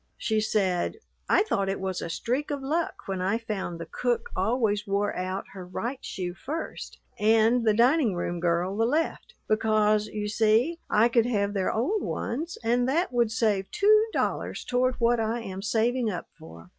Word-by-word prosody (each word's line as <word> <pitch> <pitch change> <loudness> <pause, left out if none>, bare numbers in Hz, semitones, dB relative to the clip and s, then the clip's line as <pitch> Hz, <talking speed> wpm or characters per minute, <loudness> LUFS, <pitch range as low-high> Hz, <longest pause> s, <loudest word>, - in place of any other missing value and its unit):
She 220 -1 0
said: 195 - 0 0.3
"I - - +5
thought 200 - -1
it 195 - -2
was 190 -1 -3
a - - -4
streak 250 - -2
of 285 -2 -3
luck 320 +5 -2
when 190 -1 -2
I 195 +4 +1
found 205 -7 -4
the 165 - -5
cook 240 +8 -2
always 205 +1 0
wore 200 +1 0
out 185 +1 -3
her 190 -2 -7
right 235 +9 -5
shoe 180 -2 -4
first 305 - -6 0.2
and 225 +3 +4
the 215 - +4
dining 245 - +3
room 175 0 -2
girl 175 +2 0
the 225 +2 +2
left, 325 - -1
because, 215 -1 +2
you 210 -1 -4
see, 225 +10 +2
I 220 +3 +5
could 235 -1 +2
have 205 -4 0
their 195 -2 0
old 350 - 0
ones 315 +9 -3
and 245 +2 +2
that 330 +1 0
would 235 -2 +2
save 215 -4 +1
two 425 +1 +4
dollars - - -2
toward 250 0 +1
what 235 0 +2
I 225 +2 -1
am 190 -3 -6
saving 230 +3 +1
up 180 -4 -5
for. 85 - -13
220 Hz, 180 wpm, -27 LUFS, 195-245 Hz, 0.3 s, I